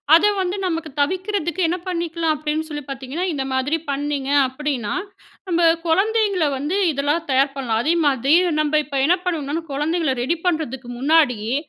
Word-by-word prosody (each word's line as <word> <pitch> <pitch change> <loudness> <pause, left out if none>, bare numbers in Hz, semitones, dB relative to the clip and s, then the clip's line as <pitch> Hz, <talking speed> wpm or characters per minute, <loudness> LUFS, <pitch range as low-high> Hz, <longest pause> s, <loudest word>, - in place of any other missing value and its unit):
அத 340 - +5
வந்து 370 +1 -1
நமக்கு 330 -3 -2
தவிர்க்கறதுக்கு 370 +2 -1
என்ன 350 - -1
பண்ணிக்கலா? 335 -2 -2
அப்படின்னு 305 +1 -2
சொல்லி 295 -2 -6
பார்த்தீங்கன்னா, 275 +5 -4
இந்த 275 -2 -2
மாதிரி 260 +4 0
பண்ணிங்க 280 -1 -2 0.2
அப்படின்னா 260 -5 -3 0.6
நம்ம 345 -1 +1 0.2
குழந்தைங்கள 395 +1 +2
வந்து 295 +7 -2 0.2
இதெல்லா 285 +1 0
தயார் 270 +1 +2
பண்ணலாம். 235 -4 -1
அதேமாதிரி 290 -4 +2 0.3
நம்ம 305 0 +2
இப்போ 285 -2 -5
என்ன 355 +4 +4
பண்ணுவோம்னா, 325 -2 -2
குழந்தைங்கள 305 +1 0
ரெடி 320 +7 0
பண்ணுறதுக்கு 270 -8 -2
முன்னாடியே, 260 -6 +2
300 Hz, 145 wpm, -21 LUFS, 275-340 Hz, 0.6 s, அத